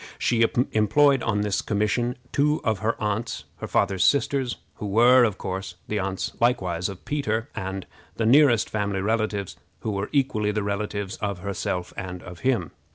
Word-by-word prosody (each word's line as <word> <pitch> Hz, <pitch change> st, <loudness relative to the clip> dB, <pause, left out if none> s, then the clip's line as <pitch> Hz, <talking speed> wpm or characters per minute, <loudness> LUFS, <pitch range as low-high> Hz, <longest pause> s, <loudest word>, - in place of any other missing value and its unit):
She 115 Hz, -1 st, +2 dB, 0.3 s
employed 135 Hz, +6 st, +4 dB
on 105 Hz, -2 st, 0 dB
this 105 Hz, -1 st, 0 dB
commission 110 Hz, +4 st, 0 dB
two 150 Hz, +2 st, +2 dB
of 110 Hz, -3 st, 0 dB
her 110 Hz, +2 st, -1 dB
aunts, 110 Hz, +2 st, -2 dB
her -, -, -6 dB
father's 95 Hz, -1 st, +1 dB
sisters, 140 Hz, -3 st, +2 dB, 0.2 s
who 105 Hz, -, -4 dB
were, 120 Hz, +5 st, +6 dB
of 105 Hz, -5 st, +1 dB
course, 95 Hz, -1 st, -5 dB
the 105 Hz, -, -1 dB
aunts 95 Hz, 0 st, -2 dB
likewise 95 Hz, -7 st, +1 dB
of 95 Hz, -2 st, -10 dB
Peter, 115 Hz, -7 st, -1 dB
and 95 Hz, 0 st, -4 dB, 0.3 s
the 115 Hz, -, -1 dB
nearest 120 Hz, -2 st, +5 dB
family 100 Hz, -2 st, -1 dB
relatives, 105 Hz, -2 st, -1 dB, 0.2 s
who 110 Hz, -, -2 dB
were 100 Hz, 0 st, -3 dB
equally 130 Hz, -7 st, +1 dB
the 105 Hz, 0 st, -1 dB
relatives 100 Hz, 0 st, -3 dB
of 100 Hz, -4 st, -3 dB
herself 90 Hz, -2 st, -3 dB
and 90 Hz, -2 st, -6 dB
of 90 Hz, 0 st, -10 dB
him. 120 Hz, -, 0 dB
105 Hz, 165 wpm, -25 LUFS, 95-120 Hz, 0.3 s, were